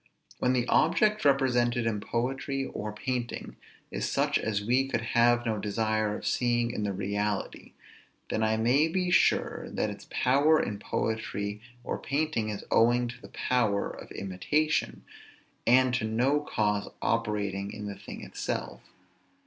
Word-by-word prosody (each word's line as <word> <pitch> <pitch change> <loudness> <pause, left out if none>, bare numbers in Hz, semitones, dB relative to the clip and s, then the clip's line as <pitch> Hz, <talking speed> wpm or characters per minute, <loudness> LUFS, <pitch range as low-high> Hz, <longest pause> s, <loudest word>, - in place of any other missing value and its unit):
When 125 - +2
the 125 -1 +1
object 210 +7 +3
represented 125 -4 +2
in 110 -2 0
poetry 135 +5 -2
or 105 -3 -5
painting 120 +2 -4 0.4
is - - -2
such - - +2
as 105 -2 -1
we 130 +4 +2
could 130 - -1
have 120 0 +4
no 110 -2 0
desire 110 0 0
of - - -9
seeing 120 -1 +1
in 110 - -4
the 105 -1 -1
reality, 100 +1 -3 0.6
then 110 - 0
I 110 0 +2
may 125 +8 +3
be 180 +2 -1
sure - - +2
that - - -1
its - - -10
power 145 +5 +4
in 100 -1 -2
poetry 105 -1 -3 0.2
or - - -3
painting 140 -6 -1
is 105 - -5
owing 120 +1 +4
to 120 +1 -10
the - - -12
power 110 -6 0
of - - -10
imitation, 145 +12 -1 0.6
and 130 +1 +5
to 125 -3 0
no 125 +7 +2
cause 105 -7 -1
operating 105 -3 -1
in 105 -1 -7
the 100 - -4
thing - - -9
itself. - - -4
120 Hz, 150 wpm, -29 LUFS, 105-130 Hz, 0.6 s, and